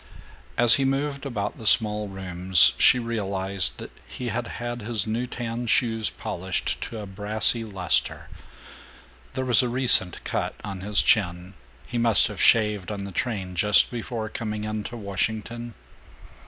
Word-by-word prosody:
As 120 0 +5
he 135 - 0
moved 140 +1 -2
about 105 -6 -4
the 110 - -6
small 105 -1 +2
rooms 90 -7 +5
she - - +6
realized 100 - 0
that - - -10 0.2
he 125 -2 -6
had 120 +1 -4
had 120 0 -5
his 110 -2 -2
new 115 +3 -3
tan 120 -1 -5
shoes 115 -1 +1
polished 95 -4 -4
to 115 - -8
a 105 - -7
brassy 105 +4 -1
luster. 95 -6 -1 1.1
There 130 - -2
was 125 -2 +4
a 125 - -2
recent 120 -8 +2
cut - - -3
on 100 -3 -7
his 105 +1 +2
chin. 90 -2 +1 0.3
He 120 - -4
must 115 -2 +4
have 105 - -6
shaved 105 -4 +2
on 100 -1 -5
the 100 - -8
train 95 -4 -4
just 105 +3 +5
before 115 -2 -5
coming 105 -1 -5
into 110 +2 -5
Washington. 110 +3 -4
110 Hz, 155 wpm, -24 LUFS, 100-120 Hz, 1.1 s, she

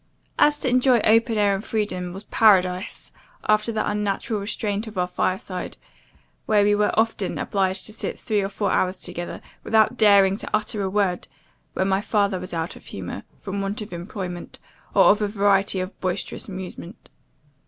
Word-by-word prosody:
And 295 - +6
to 295 - -3
enjoy 255 0 +4
open 225 +1 +3
air 205 -1 +3
and 195 +1 -3
freedom, 185 -6 -2
was 195 +3 -8
paradise, 190 -3 +2 0.4
after 215 +2 +3
the 215 -1 -1
unnatural 210 +1 -1
restraint 205 +1 -3
of 215 -3 -9
our 180 - +2
fireside, 185 +1 -3 0.7
where 210 -2 +4
we 205 0 +4
were 210 0 +2
often 225 -4 0
obliged 190 -1 -1
to 215 - -8
sit - - -4
three 210 -2 0
or 195 - -2
four 200 -1 -1
hours 185 +1 +1
together, 175 -1 -6 0.2
without 220 +2 +3
daring 200 -3 +5
to - - -6
utter 215 0 -2
a 190 - -1
word, 190 -3 0 0.5
when 190 - 0
my 195 0 +1
father 200 -3 +1
was 185 0 -6
out 165 0 -3
of - - -15
humour, - - -6 0.2
from 200 0 -4
want 195 +2 -3
of 205 - -10
employment, 175 0 -6 0.4
or - - +7
of 210 +1 +1
a 210 - +1
variety 200 -2 +2
of 185 +2 -5
boisterous 185 -1 -3
amusement. 185 -1 -8
200 Hz, 175 wpm, -23 LUFS, 185-215 Hz, 0.7 s, or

